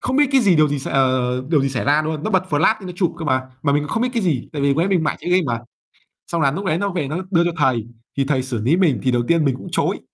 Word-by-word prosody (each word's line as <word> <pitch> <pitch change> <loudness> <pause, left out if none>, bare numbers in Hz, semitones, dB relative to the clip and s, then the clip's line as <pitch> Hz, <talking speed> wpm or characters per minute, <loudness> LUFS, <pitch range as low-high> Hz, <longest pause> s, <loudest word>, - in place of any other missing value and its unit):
Không 260 - -1
biết 290 -1 +5
cái 265 - +5
gì, 190 -7 +3
điều 155 -1 +4
gì, 145 0 -2
s 135 - -6
ờ, 130 -2 +1
điều 155 -4 +3
gì 135 - +1
xảy 130 -2 -3
ra 150 +2 +3
luôn, 155 -1 -3
nó 215 - -1
bật 190 -2 +2
flash 160 +9 +3
nó 180 - -6
chụp 180 -3 0
cơ 165 - -5
mà, 130 -2 +1 0.2
mà 140 - +2
mình 145 +1 +1
cũng 150 - -6
không 225 - 0
biết 255 - +1
cái 230 - 0
gì 150 -10 -1
tại 145 -2 -3
vì 140 - +3
lúc 140 - +1
đấy 175 +4 +1
mình 180 -4 +2
mải 155 - -1
chơi 175 - -4
game 180 0 +4
mà. 115 -2 -2 0.7
Xong 170 -2 -2
là 135 -2 +3
núc 195 +6 -5
đấy 160 -2 +1
nó 200 +2 -1
về 175 -7 -2
nó 155 +4 -3
đưa 170 -1 +4
cho 175 - 0
thầy. 125 -6 +1 0.3
Thì 135 - +1
thầy 135 -2 0
xử 125 -4 -3
lý 140 +8 +3
mình 165 - +2
thì 130 - +2
đầu 120 -1 +1
tiên 165 -3 +2
mình 135 -2 +1
cũng - - -10
chối. - - 0
150 Hz, 335 wpm, -20 LUFS, 135-175 Hz, 0.7 s, biết